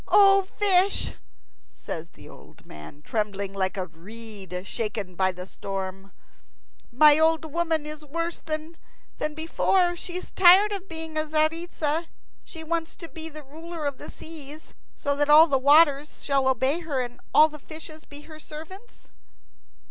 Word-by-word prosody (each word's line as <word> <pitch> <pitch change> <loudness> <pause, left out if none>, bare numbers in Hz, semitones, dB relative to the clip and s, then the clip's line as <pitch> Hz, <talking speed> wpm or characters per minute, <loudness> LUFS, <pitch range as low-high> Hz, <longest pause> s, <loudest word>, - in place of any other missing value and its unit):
"O 395 -1 +6 0.2
fish," 390 -1 +3 0.6
says 165 +1 -7
the - - -16
old - - -16
man, 75 - -12
trembling 200 -2 -3
like 190 0 -2
a 185 - -2
reed 190 +1 -8
shaken 210 -4 -4
by 185 +1 +1
the 180 0 -8
storm, 195 0 -6 0.8
"my 295 +4 +7
old 320 -1 +2
woman 330 -3 0
is 305 0 -7
worse 335 +3 -3
than 310 +1 -5 0.6
before. 350 +3 +1
She 350 +1 -5
is 365 - -8
tired 380 +3 +7
of 390 -1 -5
being 320 -1 -4
Tzaritza. 310 +1 0 0.4
She 320 -2 -9
wants 325 0 -2
to 335 - -9
be 320 0 -5
the 305 -1 -10
ruler 320 +3 -8
of 280 -2 -3
the - - -9
seas, 310 -1 -9 0.2
so 285 0 -1
that 290 0 +1
all 305 +2 +9
the 275 -5 +1
waters 290 +1 +4
shall 275 -2 +1
obey 265 +5 +2
her 300 -6 -2
and 245 0 -9
all 310 - +7
the 300 -1 -11
fishes 315 +1 -9
be 290 0 -10
her 310 0 -12
servants." 325 +10 -11
305 Hz, 155 wpm, -25 LUFS, 235-330 Hz, 0.8 s, all